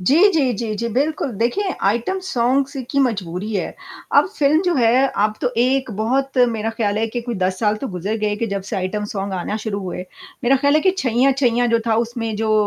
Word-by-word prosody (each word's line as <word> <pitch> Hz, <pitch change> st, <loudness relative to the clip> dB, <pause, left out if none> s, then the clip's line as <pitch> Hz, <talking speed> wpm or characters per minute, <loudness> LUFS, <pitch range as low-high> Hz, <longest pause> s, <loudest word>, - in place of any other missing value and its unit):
जी, 265 Hz, +12 st, +3 dB, 0.2 s
जी, 275 Hz, -6 st, +2 dB
जी, 215 Hz, 0 st, -3 dB
जी, 235 Hz, +3 st, -2 dB
बिल्कुल, 285 Hz, 0 st, 0 dB
देखिए, 370 Hz, -, 0 dB
item 235 Hz, -, +1 dB
songs 270 Hz, -2 st, +1 dB, 0.2 s
की 280 Hz, -, 0 dB
मजबूरी 200 Hz, -2 st, -3 dB
है। 190 Hz, -, -2 dB, 0.4 s
अब -, -, +4 dB
फ़िल्म 300 Hz, +3 st, +3 dB
जो 355 Hz, -2 st, +1 dB
है, 250 Hz, +1 st, +4 dB
अब 210 Hz, +1 st, 0 dB
तो 250 Hz, -, +1 dB
एक 260 Hz, 0 st, +1 dB
बहुत 255 Hz, +6 st, -1 dB
मेरा 225 Hz, -1 st, -2 dB
ख़याल 215 Hz, -2 st, -1 dB
है 225 Hz, -, +1 dB
कि 240 Hz, -, -1 dB
कोई 235 Hz, 0 st, -4 dB
10 185 Hz, -1 st, -1 dB
साल 210 Hz, -1 st, +2 dB
तो 240 Hz, -, -5 dB
गुज़र 200 Hz, +5 st, -2 dB
गए 210 Hz, -1 st, -1 dB
कि -, -, +2 dB
जब 200 Hz, -2 st, -3 dB
से -, -, -3 dB
आइटम 195 Hz, +3 st, -2 dB
सॉन्ग 195 Hz, -1 st, -3 dB
आना 190 Hz, +3 st, -2 dB
शुरू 210 Hz, -2 st, -3 dB
हुए। 180 Hz, -1 st, -5 dB, 0.4 s
मेरा 270 Hz, +3 st, +5 dB
ख़याल 285 Hz, +2 st, +2 dB
है 310 Hz, -, +4 dB
कि 375 Hz, -, +4 dB
छैंया-छैंया 250 Hz, -2 st, +2 dB
जो 230 Hz, -, +4 dB
था, 225 Hz, -, +2 dB
उसमें 230 Hz, -2 st, -4 dB
जो 220 Hz, 0 st, 0 dB
230 Hz, 220 wpm, -20 LUFS, 210-265 Hz, 0.4 s, मेरा